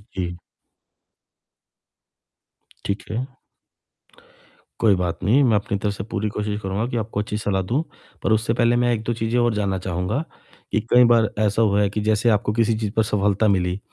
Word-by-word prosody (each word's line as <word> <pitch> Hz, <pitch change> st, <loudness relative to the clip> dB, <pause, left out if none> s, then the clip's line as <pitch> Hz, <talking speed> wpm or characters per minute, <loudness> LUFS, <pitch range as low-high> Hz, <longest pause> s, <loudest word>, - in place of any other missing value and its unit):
जी। 90 Hz, -2 st, -3 dB, 2.5 s
ठीक 100 Hz, +1 st, -2 dB
है। 130 Hz, +4 st, -4 dB, 1.5 s
कोई 105 Hz, -3 st, +4 dB
बात 90 Hz, -2 st, -2 dB
नहीं, 120 Hz, +10 st, +4 dB
मैं 115 Hz, -5 st, +3 dB
अपनी 100 Hz, 0 st, -1 dB
तरफ 100 Hz, +1 st, -2 dB
से 95 Hz, -, -6 dB
पूरी 105 Hz, 0 st, -3 dB
कोशिश 105 Hz, 0 st, -3 dB
करूँगा 100 Hz, +3 st, -2 dB
कि 120 Hz, -, -2 dB
आपको 110 Hz, -2 st, -3 dB
अच्छी 105 Hz, 0 st, -3 dB
सलाह 100 Hz, -2 st, -1 dB
दूँ। 120 Hz, -, -1 dB, 0.4 s
पर -, -, +1 dB
उससे 110 Hz, +1 st, +2 dB
पहले 120 Hz, 0 st, +2 dB
मैं 120 Hz, 0 st, +2 dB
एक-दो 115 Hz, +1 st, -2 dB
चीजें 115 Hz, +1 st, -1 dB
और 120 Hz, -1 st, +2 dB
जानना 100 Hz, -2 st, -1 dB
चाहूँगा 90 Hz, -, -2 dB, 0.5 s
कि -, -, +2 dB
कई 125 Hz, 0 st, +6 dB
बार 115 Hz, -3 st, +4 dB
ऐसा 105 Hz, +1 st, +2 dB
हुआ 105 Hz, -2 st, +3 dB
है 100 Hz, -, +2 dB
कि 105 Hz, +2 st, -3 dB
जैसे 110 Hz, +2 st, +2 dB
आपको 105 Hz, -1 st, +1 dB
किसी 115 Hz, 0 st, +2 dB
चीज 110 Hz, -2 st, -2 dB
पर 110 Hz, -, +2 dB
सफलता 105 Hz, 0 st, +1 dB
मिली, 90 Hz, -2 st, +1 dB
105 Hz, 175 wpm, -22 LUFS, 100-115 Hz, 2.5 s, कई